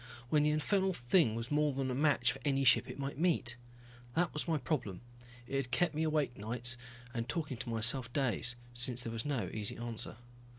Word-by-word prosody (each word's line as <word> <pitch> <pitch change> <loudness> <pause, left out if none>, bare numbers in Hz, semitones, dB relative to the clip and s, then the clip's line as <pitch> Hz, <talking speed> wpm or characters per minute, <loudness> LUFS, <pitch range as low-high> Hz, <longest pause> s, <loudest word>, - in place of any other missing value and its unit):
When 150 +2 +4
the 150 - +3
infernal 190 +5 +1
thing 125 -2 +3
was 115 +3 -4
more 150 -1 +2
than 130 -1 -1
a - - -1
match 130 -3 +3
for 135 - -8
any 140 -2 +2
ship 130 - +5
it - - -6
might 140 0 -4
meet. 160 -9 +2 0.6
That 175 0 +1
was 150 - -2
my 160 -2 +2
problem. 125 - -2 0.4
It 135 +2 -2
had 135 -2 -2
kept 170 +5 +2
me 155 - -1
awake 155 -5 +1
nights 120 +3 -1 0.4
and 115 -1 -3
talking 145 -1 -2
to 125 +1 -5
myself 120 +2 +1
days, 120 -3 0 0.2
since 120 0 +2
there 115 - -4
was 115 +2 -3
no 140 -6 -1
easy 105 -2 -2
answer. 115 -2 -3
130 Hz, 205 wpm, -34 LUFS, 120-150 Hz, 0.6 s, ship